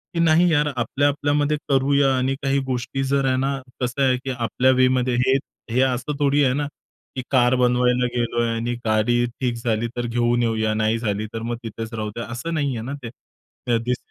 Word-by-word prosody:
की - - 0
नाही 165 +2 +4
यार 150 -1 +3
आपल्या, 135 +4 +1
आपल्यामध्ये 145 +1 0
करूया 135 0 +3
आणि 130 +1 0
काही 140 0 +2
गोष्टी 130 +1 -2
जर 135 0 +1
आहे 130 -1 +2
ना 135 +1 -1 0.2
कसं 125 +2 -1
आहे, 130 -1 +3
की 135 - -2
आपल्या 125 +2 +1
वेमध्ये 130 -1 +2
हे 130 +1 +4 0.3
हे 130 +2 +2
असं 130 +2 0
थोडी 145 0 +3
आहे 130 -1 +3
ना 145 +1 -1 0.5
की 130 - -2
कार 125 -1 +4
बनवायला 125 0 +2
गेलोय 120 0 0
आणि 115 +1 -2
गाडी 110 +3 +2
ठीक 125 -3 -1
झाली 115 0 0
तर 120 - -2
घेऊन 120 0 +1
येऊया. 110 -1 0
नाही 110 +1 +1
झाली 105 -2 -2
तर 115 - -4
मग 120 +1 -3
तिथेच 115 0 -6
राहू 110 -1 -3
द्या. 115 - -4
असं 125 +8 -4
नाहीये 140 -7 -1
ना 135 +5 -5
ते. 115 - -5 0.7
धीस 125 +2 -1
125 Hz, 195 wpm, -22 LUFS, 120-135 Hz, 0.7 s, नाही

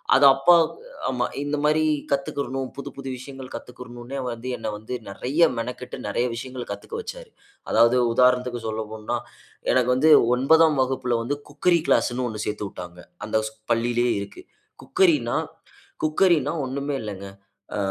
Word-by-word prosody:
அது 140 +2 +6
அப்பாவுக்கு 170 - +3 0.2
ஆமா. 125 -2 0 0.2
இந்தமாரி 150 +2 +1 0.3
கத்துக்கிறணும், 135 -1 -2
புது 140 0 -6
புது 135 -1 -6
விஷயங்கள் 130 0 -10
கத்துக்கிறணுன்னே 125 +2 -8
வந்து 120 +2 -6
என்ன - - -5
வந்து 110 +4 -8 0.2
நிறைய 130 +10 -4 0.2
மெனக்கெட்டு 125 +2 -5
நிறைய 120 - 0
விஷயங்கள் 125 +1 -6
கத்துக்க 460 - -7
வச்சாரு. - - -8 0.4
அதாவது 115 +2 +5 0.2
உதாரணத்துக்கு 125 -1 +3
சொல்லப்போனோ, 110 0 -3 0.6
எனக்கு 125 -1 +3
வந்து 155 +4 +4 0.2
9 155 +2 +4
வகுப்புல 130 -2 -1
வந்து 145 +4 -2
குக்கரி 175 -2 +2
கிளாஸ்ன்னு 125 +1 +2
ஒண்ணு 110 -1 -5
சேர்த்துவுட்டாங்க. 90 -4 -6 0.3
அந்த 110 - 0
ஸ் - - -21 0.2
பள்ளியிலேயே 120 +1 +2
இருக்கு. 360 - -9 0.4
குக்கரின்னா, 370 -5 +2 0.7
குக்கரின்னா 155 -2 +3
ஒண்ணுமே 140 +2 -3
இல்லங்க. 100 -2 -6 0.5
அ - - -2
130 Hz, 130 wpm, -24 LUFS, 120-145 Hz, 0.7 s, அது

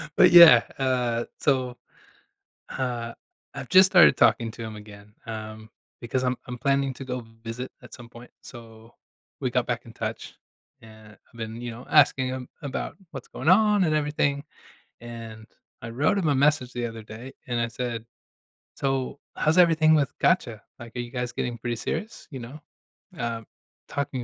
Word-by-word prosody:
but - - +6
yeah, 170 -9 +10 0.2
uh, 125 -3 0
so, 130 -3 0 1.0
uh 120 -3 -3 0.4
I've - - -7
just 185 -1 +7
started 175 -9 +7
talking 115 -1 +3
to 115 - -9
him 110 -1 -7
again, 105 0 -13
um, 110 -1 -8 0.3
because 130 +2 -2
I'm 125 0 0
I'm 125 -1 -6
planning 140 0 +1
to 135 - -8
go 125 -2 -5 0.2
visit 120 +3 -5
at - - -14
some 120 -2 -12
point, 120 +1 -14
so, 115 -1 -13 0.5
we - - -1
got - - 0
back - - -3
in - - -12
touch, - - -6 0.5
and 110 -1 -15 0.2
I've - - -21
been, 110 +1 -6
you 120 - -5
know, 120 +2 -11
asking 135 -3 +4
him 130 -1 -5
about 140 -3 -5 0.2
what's 135 -4 -8
going 140 - -4
on, 210 0 +5
and 155 -2 +1
everything, 145 -1 0 0.6
and 115 -2 -9 0.3
I 115 - -7
wrote 135 +11 +1
him 165 - -1
a 145 - +2
message 140 -2 +2
the 120 -1 -2
other 115 -1 -8
day, 115 +5 -10
and 120 -1 -1
I 115 - 0
said, 115 -1 -4 0.7
"So, 135 0 -2 0.2
how's 160 +4 +2
everything 160 -2 +5
with 145 -3 +1
Katya, 115 - +1 0.2
like, 115 -1 -10
are 120 - -2
you 120 - -11
guys 125 -1 -4
getting 120 -1 -3
pretty 120 +1 -3
serious?" 215 - -5
You 135 - -7
know, 120 +5 -9 0.6
uh, 115 -1 -3 0.5
talking 140 -3 -3
125 Hz, 175 wpm, -25 LUFS, 115-140 Hz, 1.0 s, yeah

